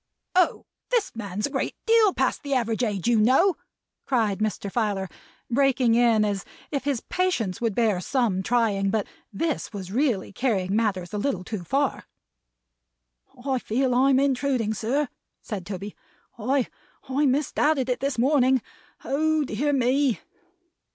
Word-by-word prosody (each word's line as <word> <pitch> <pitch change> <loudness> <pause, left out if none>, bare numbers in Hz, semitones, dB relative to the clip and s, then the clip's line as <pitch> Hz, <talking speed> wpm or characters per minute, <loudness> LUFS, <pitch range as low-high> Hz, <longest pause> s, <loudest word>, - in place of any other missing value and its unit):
"Oh! 365 -2 +2 0.2
This 480 - 0
man's 205 -2 -3
a 285 - -4
great 270 - -2
deal 450 -3 +5
past 265 -6 0
the 280 -2 -1
average 230 -1 0
age, 205 -3 -1
you 235 -2 +4
know," 270 - +4 0.5
cried 220 -7 +1
Mr. 210 -2 -2
Filer, 205 -4 -1 0.4
breaking 255 -2 +3
in 230 -2 +4
as 200 -1 -2 0.3
if 280 -2 -2
his 275 -5 0
patience 250 - -1
would 225 -4 0
bear 215 -6 +2
some 220 -3 0
trying, 205 -3 +1
but 210 0 0 0.3
this 305 +9 -2
was 190 -3 -7
really 235 -6 0
carrying 200 -5 0
matters 200 -5 -1
a 210 - -1
little 225 -6 -1
too 195 -1 -5
far. 275 +7 -1 1.4
"I 265 -2 +1
feel 250 +3 0
I'm 265 +1 +4
intruding, 265 -5 +1
sir," 255 +7 0 0.3
said 195 -5 -6
Toby. 200 +1 -6 0.4
"I 255 +3 +1 0.4
I 280 +3 +2
misdoubted 280 0 +1
it 250 - -1
this 275 -1 -2
morning. 260 -1 +3 0.4
Oh 310 +2 +1
dear 285 +4 -1
me!" 265 -1 +2
245 Hz, 145 wpm, -25 LUFS, 210-275 Hz, 1.4 s, deal